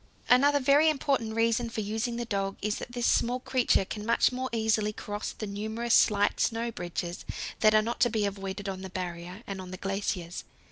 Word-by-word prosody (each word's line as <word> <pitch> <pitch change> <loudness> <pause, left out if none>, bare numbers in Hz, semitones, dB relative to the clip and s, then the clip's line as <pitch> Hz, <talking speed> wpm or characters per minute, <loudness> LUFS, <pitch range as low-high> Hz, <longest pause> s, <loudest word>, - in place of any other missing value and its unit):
Another 285 +3 +6
very 285 +4 +5
important 270 -7 0
reason 230 +1 +2
for 225 - -3
using 220 +3 -2
the 240 0 -3
dog 195 -3 -2
is 210 0 -1
that - - -7
this 240 -1 -1
small 245 +2 +2
creature 250 -6 +2
can 210 +2 -6
much 230 +3 +3
more 260 +1 -3
easily 220 -2 +1
cross 205 0 -5
the 215 - -6
numerous 220 +3 -2
slight 205 -2 +4
snow 230 +1 0
bridges 175 -2 -5 0.4
that 215 0 +5
are 215 - +5
not 235 +2 -3
to 240 0 +4
be 215 -3 0
avoided 195 0 -4
on 190 -1 -4
the 190 - -6
Barrier 180 +2 -6
and 195 -1 -5
on 185 - -9
the 185 - -6
glaciers. 195 -3 -3
215 Hz, 200 wpm, -29 LUFS, 195-235 Hz, 0.4 s, Another